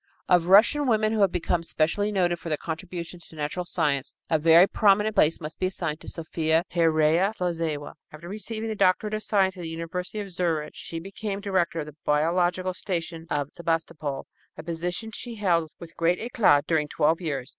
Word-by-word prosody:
Of 175 Hz, -2 st, +4 dB
Russian 235 Hz, +10 st, +5 dB
women 215 Hz, -2 st, +2 dB
who 220 Hz, -, 0 dB
have 195 Hz, -3 st, +4 dB
become 175 Hz, 0 st, 0 dB
specially 165 Hz, +6 st, 0 dB
noted 175 Hz, -4 st, +1 dB
for 165 Hz, -, -7 dB
their 155 Hz, -, 0 dB
contributions 170 Hz, +1 st, -6 dB
to -, -, -15 dB
natural 155 Hz, +4 st, -3 dB
science, 150 Hz, -7 st, -1 dB, 0.2 s
a 160 Hz, -, +3 dB
very 165 Hz, +3 st, +7 dB
prominent 210 Hz, +1 st, +3 dB
place 155 Hz, +2 st, +3 dB
must 155 Hz, 0 st, -7 dB
be 185 Hz, -, +1 dB
assigned 165 Hz, -5 st, -3 dB
to -, -, -13 dB
Sophia 160 Hz, 0 st, 0 dB
Pereyaslawzewa. 165 Hz, -1 st, +1 dB, 0.2 s
After 155 Hz, +3 st, -11 dB
receiving 215 Hz, +3 st, -5 dB
the -, -, -1 dB
doctorate 200 Hz, +2 st, +2 dB
of 215 Hz, -, -1 dB
science 195 Hz, -3 st, +1 dB
in -, -, -7 dB
the 165 Hz, -, -5 dB
University 165 Hz, +5 st, -5 dB
of 200 Hz, -2 st, -6 dB
Zurich, 165 Hz, -4 st, -1 dB
she 165 Hz, -, -8 dB
became 195 Hz, +3 st, -5 dB
director 185 Hz, -5 st, 0 dB
of -, -, -5 dB
the 150 Hz, -1 st, -11 dB
biological 175 Hz, +4 st, +1 dB
station 170 Hz, -3 st, -4 dB
at 145 Hz, -2 st, -2 dB
Sebastopol, 165 Hz, -4 st, -3 dB, 0.3 s
a -, -, -7 dB
position 175 Hz, +6 st, -4 dB
she 235 Hz, +2 st, -7 dB
held 170 Hz, -6 st, +1 dB
with 165 Hz, -1 st, -11 dB
great 170 Hz, +2 st, +2 dB
éclat 215 Hz, -, +3 dB
during 155 Hz, -2 st, +1 dB
twelve 160 Hz, +3 st, +1 dB
years. 140 Hz, -6 st, -3 dB
170 Hz, 185 wpm, -26 LUFS, 160-195 Hz, 0.3 s, very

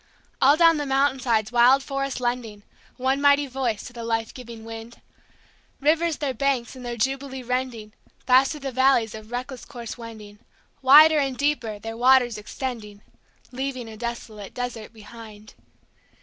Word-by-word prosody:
All 280 Hz, +3 st, +6 dB
down 330 Hz, -1 st, +5 dB
the 295 Hz, -, -2 dB
mountain 270 Hz, 0 st, +2 dB
sides 225 Hz, -4 st, 0 dB
wild 250 Hz, +3 st, +5 dB
forests 275 Hz, -1 st, -3 dB
lending 240 Hz, -4 st, -3 dB, 0.3 s
One 265 Hz, +2 st, 0 dB
mighty 285 Hz, 0 st, +4 dB
voice 255 Hz, -5 st, -3 dB
to 245 Hz, -, -10 dB
the 235 Hz, -1 st, -7 dB
life 225 Hz, -1 st, -2 dB
giving 235 Hz, -3 st, -10 dB
wind, 225 Hz, +1 st, -9 dB, 0.8 s
Rivers 315 Hz, +2 st, +1 dB
their 280 Hz, -3 st, -2 dB
banks 260 Hz, -1 st, -1 dB
in 255 Hz, -, -10 dB
their 240 Hz, -1 st, -5 dB
jubilee 265 Hz, +2 st, -2 dB
rending, 245 Hz, -4 st, -3 dB, 0.3 s
Fast 255 Hz, +1 st, +5 dB
through 300 Hz, -, -6 dB
the 270 Hz, -1 st, -4 dB
valleys 260 Hz, -3 st, +2 dB
a 220 Hz, -, -7 dB
reckless 245 Hz, +3 st, -6 dB
course 240 Hz, -3 st, -8 dB
wending, 215 Hz, -3 st, -11 dB, 0.4 s
Wider 300 Hz, +4 st, +8 dB
and 270 Hz, -3 st, -1 dB
deeper 280 Hz, -7 st, -1 dB
their 225 Hz, +2 st, -7 dB
waters 245 Hz, -2 st, +4 dB
extending, 210 Hz, -2 st, -7 dB, 0.5 s
Leaving 260 Hz, -1 st, -4 dB
a 220 Hz, -, -9 dB
desolate 220 Hz, -3 st, -7 dB
desert 245 Hz, -3 st, -5 dB
behind. 215 Hz, -1 st, -13 dB
245 Hz, 155 wpm, -24 LUFS, 225-270 Hz, 0.8 s, Wider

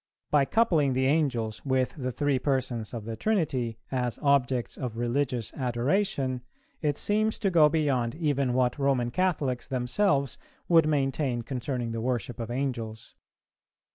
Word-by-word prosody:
By 145 Hz, -2 st, +4 dB
coupling 160 Hz, -, +2 dB
the 130 Hz, +1 st, +1 dB
Angels 130 Hz, -7 st, 0 dB
with 130 Hz, -2 st, +1 dB
the 130 Hz, -3 st, -3 dB
three 145 Hz, 0 st, 0 dB
persons 125 Hz, -5 st, -1 dB
of 115 Hz, -4 st, -6 dB
the 115 Hz, 0 st, -4 dB
Trinity, 130 Hz, -, 0 dB
as 125 Hz, -3 st, -1 dB
objects 130 Hz, -4 st, +2 dB
of 120 Hz, -3 st, -5 dB
religious 120 Hz, -1 st, -1 dB
adoration, 130 Hz, +1 st, 0 dB, 0.4 s
it 150 Hz, -3 st, 0 dB
seems 215 Hz, +1 st, +1 dB
to 195 Hz, -, 0 dB
go 155 Hz, -3 st, +6 dB
beyond 140 Hz, -6 st, 0 dB
even 140 Hz, -6 st, 0 dB
what 125 Hz, +2 st, +1 dB
Roman 135 Hz, -4 st, +1 dB
Catholics 150 Hz, -7 st, 0 dB
themselves 135 Hz, -, +1 dB, 0.3 s
would 165 Hz, -3 st, +5 dB
maintain 135 Hz, -4 st, 0 dB
concerning 125 Hz, -1 st, -3 dB
the 115 Hz, 0 st, -3 dB
worship 120 Hz, 0 st, -2 dB
of 115 Hz, -1 st, -4 dB
Angels. 120 Hz, -4 st, -4 dB
130 Hz, 140 wpm, -28 LUFS, 120-145 Hz, 0.4 s, go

